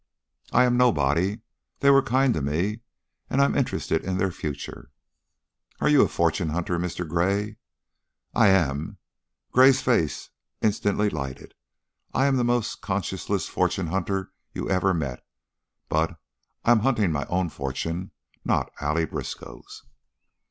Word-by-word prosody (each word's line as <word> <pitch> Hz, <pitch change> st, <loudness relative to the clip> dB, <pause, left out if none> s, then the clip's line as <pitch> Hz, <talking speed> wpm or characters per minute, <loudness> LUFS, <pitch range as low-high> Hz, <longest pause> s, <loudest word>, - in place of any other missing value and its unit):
"I -, -, +5 dB
am 125 Hz, -1 st, +3 dB
nobody. 95 Hz, -, +2 dB, 0.4 s
They 140 Hz, -, +6 dB
were 135 Hz, 0 st, +6 dB
kind 130 Hz, 0 st, +2 dB
to 80 Hz, -, -2 dB
me 85 Hz, +10 st, -1 dB, 0.5 s
and 135 Hz, -, 0 dB
I'm 140 Hz, -, +3 dB
interested 140 Hz, -, 0 dB
in 95 Hz, 0 st, -2 dB
their 95 Hz, 0 st, +1 dB
future." 75 Hz, -4 st, -6 dB, 0.9 s
"Are -, -, +2 dB
you 150 Hz, -2 st, +6 dB
a -, -, +5 dB
fortune 85 Hz, 0 st, 0 dB
hunter, 85 Hz, +2 st, -1 dB
Mr. 90 Hz, 0 st, -3 dB
Gray?" 100 Hz, +6 st, 0 dB, 0.8 s
"I 115 Hz, -3 st, +5 dB
am." 80 Hz, -7 st, +1 dB, 0.5 s
Gray's 130 Hz, +1 st, +6 dB
face 85 Hz, -, 0 dB, 0.3 s
instantly 105 Hz, -1 st, +1 dB
lighted. 70 Hz, -3 st, -6 dB, 0.6 s
"I 135 Hz, -, +3 dB
am 135 Hz, -1 st, +3 dB
the 125 Hz, -, +2 dB
most 120 Hz, -4 st, 0 dB
conscienceless 95 Hz, -4 st, -2 dB
fortune 90 Hz, -4 st, 0 dB
hunter 95 Hz, 0 st, -2 dB, 0.2 s
you -, -, -3 dB
ever 95 Hz, 0 st, +2 dB
met, 70 Hz, -8 st, -3 dB, 0.6 s
but 80 Hz, +2 st, 0 dB, 0.5 s
I 120 Hz, -, +5 dB
am 120 Hz, -, +6 dB
hunting 110 Hz, -6 st, +2 dB
my 75 Hz, -2 st, -1 dB
own 90 Hz, -1 st, 0 dB
fortune, 80 Hz, +6 st, -4 dB, 0.3 s
not -, -, 0 dB
Allie 75 Hz, +3 st, +1 dB
Briskow's." -, -, -8 dB
95 Hz, 140 wpm, -25 LUFS, 80-120 Hz, 0.9 s, They